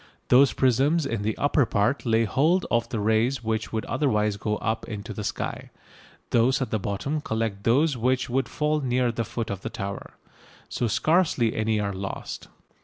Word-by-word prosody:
Those 130 +2 +6
prisms 140 +5 +2
in 115 -6 -2
the 110 +1 -2
upper 145 0 +3
part 115 +4 0
lay 115 0 +3
hold 155 - +2
of 120 0 +1
the 115 - -2
rays 110 +4 +1
which 110 0 -2
would 110 -1 -2
otherwise 105 -7 +1
go 105 +1 -2
up 110 0 -2
into 105 -2 -6
the 105 - -5
sky. - - -4 0.6
Those 125 +3 +3
at 130 - -3
the 110 - 0
bottom 105 +11 -2
collect 110 -5 -3
those 140 +5 +3
which 125 +2 0
would 130 +2 -1
fall 150 0 0
near 125 -2 +1
the 115 0 -2
foot 115 0 -4
of 100 -1 -5
the - - -4
tower. 100 -3 -6 0.5
So 120 - -1
scarcely 150 - +2
any 110 0 0
are 100 -1 -1
lost. 95 +1 -6
115 Hz, 180 wpm, -25 LUFS, 110-135 Hz, 0.6 s, Those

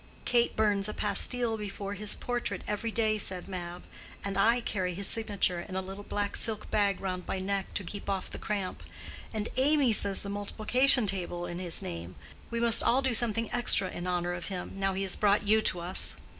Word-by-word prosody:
"Kate 240 -1 +2
burns 205 -2 +1
a - - -6
pastille 225 +3 +2
before 200 -1 -6
his 205 +1 -1
portrait 245 -1 -4
every 210 +2 -2
day," 220 -1 0
said 185 -3 -3
Mab. 180 -2 -7 0.4
"And 200 -1 -4
I 230 +5 +3
carry 185 -6 -3
his 200 +2 -1
signature 200 -6 +3
in 185 +1 -9
a 190 - -1
little 195 +2 -8
black 205 0 -3
silk 215 -2 0
bag 200 -2 +1
round 185 -2 -4
my - - -2
neck 195 +1 -3
to 200 - -2
keep 200 +3 -7
off 195 -2 -2
the - - -9
cramp. 200 -3 -4 0.5
And 215 0 -3
Amy 275 -2 +3
says 200 -1 0
the 200 - -6
multiplication 220 +5 +2
table 175 -3 -2
in 175 0 -6
his 175 -3 0
name. 85 +1 -7 0.3
We 235 - -3
must 235 -1 +5
all 260 +3 +2
do 260 -2 +1
something 230 0 +2
extra 240 -6 +5
in 175 - -6
honor 175 -1 -1
of 175 0 -5
him, 185 -3 -5
now 195 -1 -1
he 195 - -2
has 190 -2 +3
brought 205 0 +2
you 220 +1 +4
to 180 -4 +2
us." 180 +2 +1
200 Hz, 205 wpm, -29 LUFS, 185-220 Hz, 0.5 s, must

